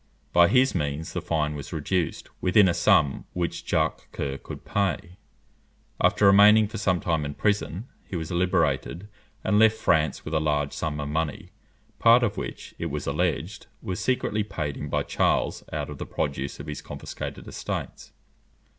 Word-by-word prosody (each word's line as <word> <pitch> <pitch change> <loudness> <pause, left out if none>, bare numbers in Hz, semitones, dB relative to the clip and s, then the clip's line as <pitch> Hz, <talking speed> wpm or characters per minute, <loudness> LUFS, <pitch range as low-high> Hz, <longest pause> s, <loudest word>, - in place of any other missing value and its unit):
By 85 0 +7
his 130 +4 +4
means 75 -1 -3
the 90 - -2
fine 80 -3 -1
was 70 -2 -7
reduced 85 +1 -2
within 95 +2 +5
a 85 - +2
sum 75 -4 +3
which 85 -2 -2
Jacques - - 0
Coeur 70 -1 -4
could - - -9
pay. 95 -2 -1 0.8
After 105 - +3
remaining 105 +2 +7
for 110 +1 -6
some 95 -3 +1
time 80 -3 0
in 70 0 -5
prison, 105 0 -1 0.2
he - - -8
was 80 -1 -4
liberated, 90 -1 0 0.4
and 105 0 +3
left 110 0 +5
France 80 -2 +1
with 80 - -5
a 80 - +3
large 75 -2 0
sum 75 -2 -3
of 75 - -3
money, 75 -1 -3 0.5
part 120 +2 +6
of 105 -3 0
which, - - -6
it - - -2
was - - -4
alleged, 75 -1 -2 0.2
was 90 - -3
secretly 125 -4 0
paid 80 -8 -4
him 75 - -6
by - - 0
Charles - - 0
out - - -3
of - - -9
the - - -5
produce 70 -1 -3
of 70 - -7
his 75 -1 -6
confiscated - - -7
estates. - - -5
85 Hz, 175 wpm, -26 LUFS, 75-100 Hz, 0.8 s, By